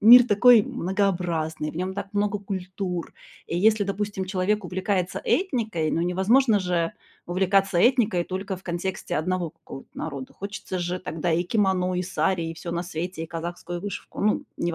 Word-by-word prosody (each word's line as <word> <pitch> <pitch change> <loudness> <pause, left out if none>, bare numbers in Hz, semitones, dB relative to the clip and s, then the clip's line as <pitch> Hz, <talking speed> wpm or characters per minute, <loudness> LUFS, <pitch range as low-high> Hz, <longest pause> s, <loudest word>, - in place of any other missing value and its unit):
мир 240 +3 +10
такой 230 +1 +7
многообразный, 175 -6 -1
в - - -10
нём 185 +2 -2
так 200 0 -4
много 205 0 0
культур. 185 -2 -4 0.4
И 170 - -1
если, 215 +2 +4
допустим, 200 -1 -2
человек 190 +2 0
увлекается 185 0 -1
этникой, 220 - 0
ну, 165 - 0
невозможно 205 +6 +3
же 175 -2 0 0.3
увлекаться 190 +1 +2
этникой 225 -4 +4
только 190 +1 -4
в 185 - -15
контексте 175 +1 -3
1 175 +1 -1
какого-то 150 -4 -11
народа. 140 -4 -5
Хочется 200 -1 -5
же 175 +1 -2
тогда 165 0 -2
и 165 +2 +2
кимоно, 185 -2 +1
и 180 - 0
сари, 175 0 0
и 165 0 -4
всё 170 +1 -6
на 170 0 -1
свете, 175 0 -4
и - - -8
казахскую 175 +1 -5
вышивку. 200 0 -6
Ну, 210 +1 +2
не 170 - -1
в - - -4
185 Hz, 170 wpm, -25 LUFS, 175-200 Hz, 0.4 s, мир